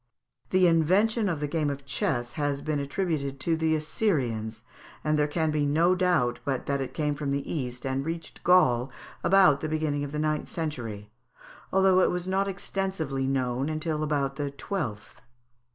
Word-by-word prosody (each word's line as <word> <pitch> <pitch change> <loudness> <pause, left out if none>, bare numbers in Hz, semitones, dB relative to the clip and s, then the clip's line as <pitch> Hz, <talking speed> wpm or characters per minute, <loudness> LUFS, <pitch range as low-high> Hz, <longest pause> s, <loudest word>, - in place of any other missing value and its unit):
The 185 0 +4
invention 195 +7 +3
of 160 -4 -2
the 150 - 0
game 150 0 0
of 140 -1 -5
chess 120 -3 -1
has 145 -2 -1
been 150 0 -1
attributed 140 -2 -2
to 165 +3 +2
the 160 0 +1
Assyrians, 125 - -1 0.4
and 155 0 +2
there 150 -1 +2
can 160 +1 0
be 150 -1 +1
no 160 +5 +3
doubt 180 -10 +1
but 135 -4 -2
that 140 -1 -1
it 135 - -5
came 150 -2 0
from 145 -1 -4
the 140 0 -2
East, 125 -5 -4
and 135 0 -1
reached 165 +1 -6
Gaul 130 -9 +4 0.3
about 185 -7 +5
the 155 - -2
beginning 155 -2 -1
of 145 - -5
the 150 - -4
ninth 155 0 -1
century, 115 -10 -5 0.6
although 190 -1 +4
it - - +4
was 180 0 -2
not 195 +1 +1
extensively 190 -8 -2
known 135 +3 -1
till 155 -1 -2
about 140 -3 -1
the 145 -1 -2
twelfth. 140 - -5
150 Hz, 175 wpm, -27 LUFS, 135-170 Hz, 0.6 s, about